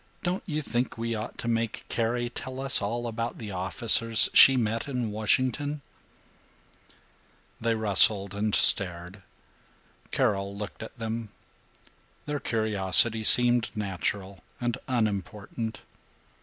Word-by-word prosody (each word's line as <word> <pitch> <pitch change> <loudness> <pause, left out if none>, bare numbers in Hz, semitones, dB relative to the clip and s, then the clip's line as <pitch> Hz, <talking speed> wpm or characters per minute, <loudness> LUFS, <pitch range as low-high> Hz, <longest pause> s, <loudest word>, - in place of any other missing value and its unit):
Don't 180 +2 -2
you 155 -2 -3
think 120 -2 -3
we 115 0 -3
ought 110 +1 -6
to - - -6
make 115 -1 -2
Carrie 120 +1 -2
tell 130 +1 -8
us 135 -3 0
about 115 +2 -4
the 110 -3 -8
officers 110 +4 0
she 135 -1 +8
met 115 0 -2
in 125 -5 -3
Washington?" 130 +7 -1 1.8
They 115 0 0
rustled 100 -2 +3
and 105 +1 +1
stared. 90 +1 +4 0.9
Carol 100 0 -1
looked 105 +1 -8
at 110 +4 -10
them. 115 -1 -5 1.0
Their 150 -1 -3
curiosity 110 -1 +2
seemed 120 +1 +5
natural 100 -2 -4 0.2
and 120 -2 -2
unimportant. 110 -1 -3
115 Hz, 115 wpm, -26 LUFS, 105-120 Hz, 1.8 s, she